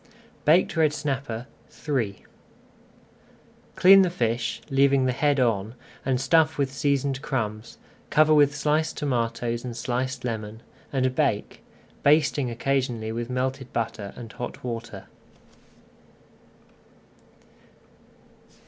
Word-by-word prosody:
BAKED 165 +2 +4
RED 155 -2 +3
SNAPPER 135 -6 -3 0.4
III 115 -9 -1 1.5
Clean 195 +2 +8
the 185 - +3
fish, 120 -6 -1
leaving 135 -1 +4
the 130 - +2
head 145 +2 +1
on, 115 -2 0 0.3
and 130 -1 0
stuff 160 +2 +3
with 135 -2 -1
seasoned 140 -1 0
crumbs, 110 -5 -4 0.3
cover 155 0 +4
with 145 -1 +4
sliced 155 +2 0
tomatoes 120 -4 -1
and 120 -2 -6
sliced 125 +2 -3
lemon, 110 -1 -5 0.3
and 130 -2 0
bake, 130 -7 -1 0.4
basting 145 -3 +3
occasionally 120 -2 -1
with 115 +1 -4
melted 130 0 -3
butter 110 -3 -3
and 115 -3 -9
hot 120 - -7
water. 115 -5 -6
130 Hz, 105 wpm, -25 LUFS, 115-145 Hz, 1.5 s, Clean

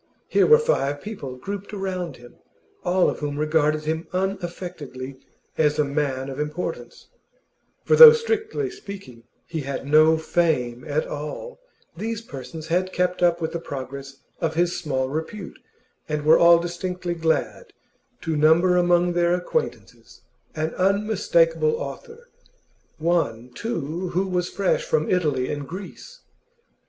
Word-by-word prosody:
Here - - +3
were 460 - +8
five 145 - 0
people 145 -10 -7
grouped 200 +10 -7
around 185 -6 -4
him, 120 0 -16 0.5
all 180 +1 +3
of - - -2
whom 145 -1 -3
regarded 155 0 +1
him 160 +1 -2
unaffectedly 175 -8 -4 0.4
as 150 -1 +3
a 150 - +3
man 140 -2 -2
of 135 0 -6
importance; 150 +4 -5 0.7
for 465 - +3
though, 470 0 +12
strictly 440 -3 -1
speaking, 190 - -10 0.2
he 160 -2 -4
had 140 0 -5
no 155 +2 +5
'fame' 155 -7 0
at 150 +1 0
all, 150 - -6 0.4
these 225 +5 -4
persons 140 - -8
had 185 +2 +1
kept 180 0 -1
up 175 -1 +3
with 160 - -2
the 170 - -3
progress 135 -2 -7 0.2
of 160 -2 -1
his 175 +1 +1
small 130 -5 -1
repute, 160 +7 -6 0.5
and 150 -1 -2
were 160 +1 +6
all 170 0 +7
distinctly 175 +1 -3
glad 160 -1 -1 0.5
to 160 -1 -2
number 165 +4 +4
among 175 0 +3
their 175 0 +2
acquaintances 320 - -4 0.3
an 155 +1 -2
unmistakable 180 -6 +2
author, 455 - -8 0.7
one, 155 -8 0
too, 175 - -3
who 190 +2 +2
was 180 -1 -1
fresh 195 -2 0
from 155 0 0
Italy 150 -8 +1
and 145 -2 -5
Greece. 200 - -9
165 Hz, 140 wpm, -23 LUFS, 150-185 Hz, 0.7 s, though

